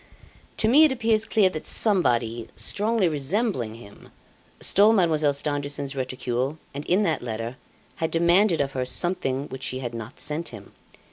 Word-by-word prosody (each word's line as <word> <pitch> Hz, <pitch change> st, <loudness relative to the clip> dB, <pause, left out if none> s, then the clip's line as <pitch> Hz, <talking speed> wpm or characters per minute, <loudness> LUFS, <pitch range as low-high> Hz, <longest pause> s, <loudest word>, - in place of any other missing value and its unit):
"To 220 Hz, -, +1 dB
me 280 Hz, +7 st, +7 dB
it 305 Hz, -, +3 dB
appears 225 Hz, -3 st, +1 dB
clear 215 Hz, -3 st, +3 dB
that 155 Hz, -, -6 dB
somebody, 120 Hz, -, +1 dB
strongly 215 Hz, -1 st, 0 dB
resembling 150 Hz, -, -1 dB
him, 105 Hz, -3 st, -14 dB, 0.5 s
stole 210 Hz, +3 st, +5 dB
Mademoiselle 160 Hz, -7 st, +3 dB
Stangerson's 145 Hz, -1 st, -2 dB
reticule 130 Hz, +2 st, -2 dB, 0.2 s
and 140 Hz, +1 st, -5 dB
in 190 Hz, +4 st, +3 dB
that 160 Hz, -6 st, 0 dB
letter, 115 Hz, +1 st, -5 dB, 0.4 s
had 160 Hz, -, -1 dB
demanded 170 Hz, +1 st, +3 dB
of 140 Hz, -1 st, -1 dB
her 130 Hz, -1 st, -2 dB
something 140 Hz, -1 st, -1 dB
which 130 Hz, -, -8 dB
she 130 Hz, -, -2 dB
had 120 Hz, -2 st, -5 dB
not 115 Hz, +3 st, -8 dB
sent 155 Hz, +3 st, -1 dB
him. 105 Hz, -4 st, -11 dB
150 Hz, 155 wpm, -25 LUFS, 130-195 Hz, 0.5 s, me